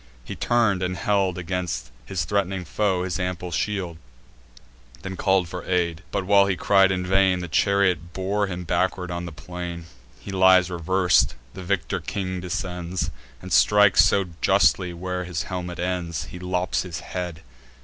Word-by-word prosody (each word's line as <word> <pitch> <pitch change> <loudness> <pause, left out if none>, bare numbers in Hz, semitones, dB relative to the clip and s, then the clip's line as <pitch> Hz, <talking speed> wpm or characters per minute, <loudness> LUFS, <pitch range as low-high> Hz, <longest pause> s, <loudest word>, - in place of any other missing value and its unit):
He - - -6
turn'd, 115 -6 +2
and 90 0 -2
held 100 -4 +1
Against 85 -9 -3 0.2
his 95 -3 -2
threat'ning 95 -2 -1
foe 95 -3 0
his 90 0 -3
ample 90 -1 -3
shield; 90 -1 -2 1.1
Then 95 -1 -5
call'd 95 -1 +2
for 90 +1 -6
aid: 85 -3 0
but, 100 -2 -2
while 100 0 +5
he 95 - +1
cried 95 +2 +4
in 90 -1 -1
vain, 95 0 +3
The 90 - -4
chariot 90 -1 +1
bore 100 +3 -1
him 90 -1 -5
backward 90 +1 -1
on 85 0 -4
the - - -7
plain. 85 +3 -7 0.3
He 100 - -8
lies 95 -1 +5
revers'd; 85 -6 +2 0.2
the 95 - -8
victor 95 -1 -1
king 95 -2 -4
descends, 90 0 -3 0.3
And - - -4
strikes 105 -2 +6
so 100 -1 +3 0.2
justly 90 -2 +3
where 90 +1 -4
his 90 -2 -3
helmet 90 -1 -5
ends, 85 -4 -2
He 80 +5 -9
lops 90 0 -1
the 90 -2 -8
head. 90 -3 -5
90 Hz, 160 wpm, -24 LUFS, 90-95 Hz, 1.1 s, strikes